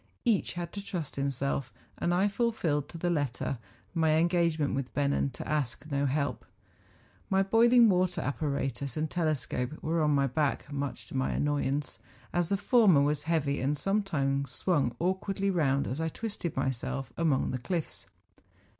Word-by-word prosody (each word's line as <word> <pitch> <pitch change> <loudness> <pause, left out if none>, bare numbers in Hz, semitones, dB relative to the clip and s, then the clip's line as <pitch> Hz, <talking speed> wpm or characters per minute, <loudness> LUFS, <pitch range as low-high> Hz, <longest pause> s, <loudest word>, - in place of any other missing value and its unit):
Each 225 -6 +2
had 175 -1 -5
to 200 - -5
trust 175 -8 -4
to 140 - -3
himself; 140 -2 -1 0.2
and 175 - -1
I 185 +3 +3
fulfilled 200 - 0
to 170 - -8
the 175 +1 0
letter 140 -4 -1 0.3
my 160 -2 +3
engagement 165 -2 +2
with 135 -2 -2
Bennen 140 -1 +1
to - - -7
ask 150 -3 -1
no 140 0 +1
help. 140 +1 -1 0.9
My 195 0 +3
boiling 235 +4 +6
water 180 -2 +2
apparatus 140 -3 -2
and 155 0 -1
telescope 150 -6 -1
were 165 +1 +1
on 150 - +3
my 140 -2 +3
back, 145 +2 -1
much 140 -1 -3
to - - -8
my 130 0 +1
annoyance, 145 -1 -1 0.3
as 175 -1 +2
the 200 - +2
former 200 - +5
was 150 0 0
heavy, 145 -5 +1
and 140 +3 0
sometimes 140 -8 0
swung 140 -10 0
awkwardly 195 +2 0
round 140 -6 +2
as 135 +6 -3
I 160 - 0
twisted 200 -5 -5
myself 130 -1 -2
among 160 -5 +1
the 130 - -2
cliffs. 165 +6 -3
150 Hz, 165 wpm, -30 LUFS, 140-180 Hz, 0.9 s, boiling